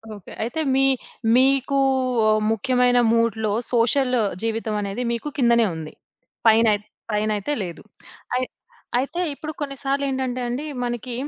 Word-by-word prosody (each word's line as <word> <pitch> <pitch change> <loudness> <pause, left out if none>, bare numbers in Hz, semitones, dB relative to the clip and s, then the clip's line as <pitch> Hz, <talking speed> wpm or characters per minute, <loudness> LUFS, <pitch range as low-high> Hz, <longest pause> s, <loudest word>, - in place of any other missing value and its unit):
Okay. 200 - -12
అయితే 245 +8 -3 0.2
మీ 270 0 +4 0.5
మీకు 270 +1 +3 0.7
ముఖ్యమైన 245 +2 +2
మూడ్‌లో 220 -2 +1 0.2
సోషల్ 250 +2 +3 0.3
జీవితం 225 -1 -2
అనేది 200 +4 -3
మీకు 235 +6 -3
కిందనే 235 -3 +4
ఉంది. 160 -1 -7 0.5
పైనైత్ 220 -2 +4 0.3
పైనయితే 210 +5 0
లేదు. 170 -2 -7 0.5
అయ్ 255 0 +1 0.5
అయితే 280 +6 -3
ఇప్పుడు 310 +2 -6
కొన్ని 275 -1 -3
సార్లేంటంటే 265 -2 -1
అండి 245 +5 -3 0.2
మనకి 240 +1 -4
240 Hz, 115 wpm, -23 LUFS, 220-270 Hz, 0.7 s, మీ